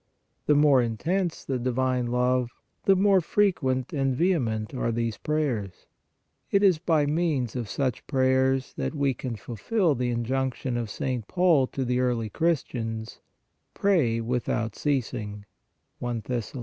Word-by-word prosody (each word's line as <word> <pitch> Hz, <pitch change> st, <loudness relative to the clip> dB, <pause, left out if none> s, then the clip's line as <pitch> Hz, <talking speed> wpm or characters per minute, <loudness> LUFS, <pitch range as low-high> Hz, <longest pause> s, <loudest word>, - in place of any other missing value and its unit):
The 150 Hz, -, +5 dB
more 145 Hz, -3 st, +5 dB
intense 165 Hz, -, -1 dB
the 130 Hz, -2 st, -1 dB
divine 125 Hz, 0 st, 0 dB
love, 125 Hz, 0 st, +1 dB, 0.4 s
the 195 Hz, -, +6 dB
more 195 Hz, 0 st, +4 dB
frequent 145 Hz, -10 st, +1 dB
and 135 Hz, -3 st, +1 dB
vehement 125 Hz, -, 0 dB
are 125 Hz, -2 st, -1 dB
these 115 Hz, -1 st, -2 dB
prayers. 130 Hz, -12 st, -2 dB, 0.6 s
It 200 Hz, 0 st, +3 dB
is 185 Hz, -5 st, +5 dB
by 155 Hz, -3 st, +2 dB
means 145 Hz, -6 st, 0 dB
of 120 Hz, -5 st, -3 dB
such 130 Hz, -2 st, -2 dB
prayers 130 Hz, -1 st, +2 dB
that -, -, -2 dB
we 140 Hz, -2 st, +1 dB
can 125 Hz, -1 st, -5 dB
fulfil 150 Hz, -, 0 dB
the 125 Hz, -1 st, -1 dB
injunction 125 Hz, +1 st, -1 dB
of 120 Hz, -2 st, -2 dB
St. 125 Hz, -1 st, -3 dB
Paul 175 Hz, -7 st, +3 dB
to 135 Hz, 0 st, -3 dB
the 125 Hz, 0 st, 0 dB
early 120 Hz, -3 st, 0 dB
Christians: 115 Hz, -9 st, -2 dB, 0.3 s
" -, -, -49 dB
Pray 155 Hz, -, +2 dB
without 115 Hz, -2 st, -2 dB
ceasing" 110 Hz, -7 st, -2 dB, 0.6 s
(I 120 Hz, -1 st, -2 dB
Thess. 120 Hz, -1 st, -3 dB
130 Hz, 145 wpm, -26 LUFS, 120-150 Hz, 0.6 s, the